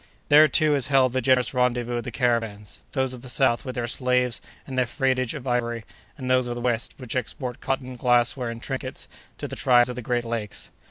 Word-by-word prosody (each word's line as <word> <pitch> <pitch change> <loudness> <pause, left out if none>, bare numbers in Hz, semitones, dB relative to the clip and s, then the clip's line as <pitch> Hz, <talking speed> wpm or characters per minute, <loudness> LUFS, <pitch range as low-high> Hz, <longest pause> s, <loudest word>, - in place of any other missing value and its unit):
There, 150 +1 +8
too, 155 +1 +3
is 140 -2 +1
held 135 -3 +3
the 130 - +1
general 130 -2 +4
rendezvous 120 -1 0
of 120 - -3
the 125 - -5
caravans—those 115 +1 -2
of 125 - -9
the 130 - -9
south, 120 -1 +2
with 130 - -6
their 120 - -1
slaves 125 0 0 0.2
and 130 - -7
their 125 -1 +2
freightage 130 -1 0
of 135 -4 -7
ivory; 120 -2 -1 0.3
and 130 -3 -6
those 130 -1 +2
of 120 - -3
the - - -5
west, 120 -2 -1
which 125 -3 -6
export 125 0 -4
cotton, 130 -1 -3
glassware, 120 0 +2
and 115 0 -7
trinkets, 130 -1 -5 0.3
to - - -5
the - - -6
tribes 125 -1 +4
of 125 - -4
the 125 - -5
great 120 0 -1
lakes. 115 -3 -5
125 Hz, 215 wpm, -25 LUFS, 120-130 Hz, 0.3 s, There